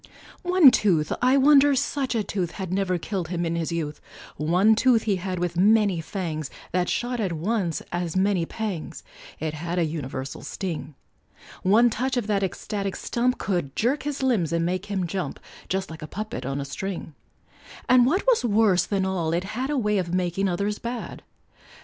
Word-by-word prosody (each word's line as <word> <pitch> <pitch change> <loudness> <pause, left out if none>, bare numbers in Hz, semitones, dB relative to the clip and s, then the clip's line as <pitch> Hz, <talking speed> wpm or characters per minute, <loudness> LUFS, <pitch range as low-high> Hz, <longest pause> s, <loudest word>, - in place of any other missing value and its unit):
One 360 -6 +7
tooth 170 -11 +2
I 255 +2 +4
wonder 285 0 +6
such 265 -1 -1
a 220 - +1
tooth 185 -4 -3
Had 190 -3 -5
never 190 -2 +1
killed 180 0 -3
him 175 0 -2
in 165 0 -1
his 165 0 -2
youth 155 -3 -3 0.3
One 180 +8 +3
tooth 230 0 +3
he 200 -3 +1
had 185 0 -4
with 175 -1 -2
many 205 -2 +4
fangs, 155 -5 -4 0.2
That 180 0 0
shot 245 0 -1
at 190 -6 -1
once 175 0 -1
as 175 -1 -2
many 190 -3 +2
pangs, 210 -7 -5 0.4
It 155 -1 -2
had 170 +3 -4
a 170 - +3
universal 135 -4 -5
sting; 160 -6 -5 0.7
One 225 +5 +5
touch 255 +4 -1
of 240 - 0
that 205 -2 +1
ecstatic 195 +1 -3
stump 250 +1 0
Could 175 -9 -2
jerk 255 +6 +1
his 285 -2 -3
limbs 215 - +1
and 165 0 +1
make 185 +3 -2
him 195 -3 -1
jump, 185 +2 -4 0.3
Just 190 -2 -2
like 160 - -9
a 155 - -6
puppet 200 -10 -5
on 135 +1 -2
a 140 - -3
string; 175 +2 -5 0.7
And 250 -1 +6
what 365 +9 +1
was - - +3
worse 205 -5 +3
than 195 -2 0
all, 175 -4 -1
it 175 +2 0
had 245 +7 -3
A 295 - 0
way 210 -4 +1
of 175 -2 -3
making 185 +2 0
others 200 +4 -1
bad. 235 +1 -5
190 Hz, 185 wpm, -25 LUFS, 170-225 Hz, 0.7 s, One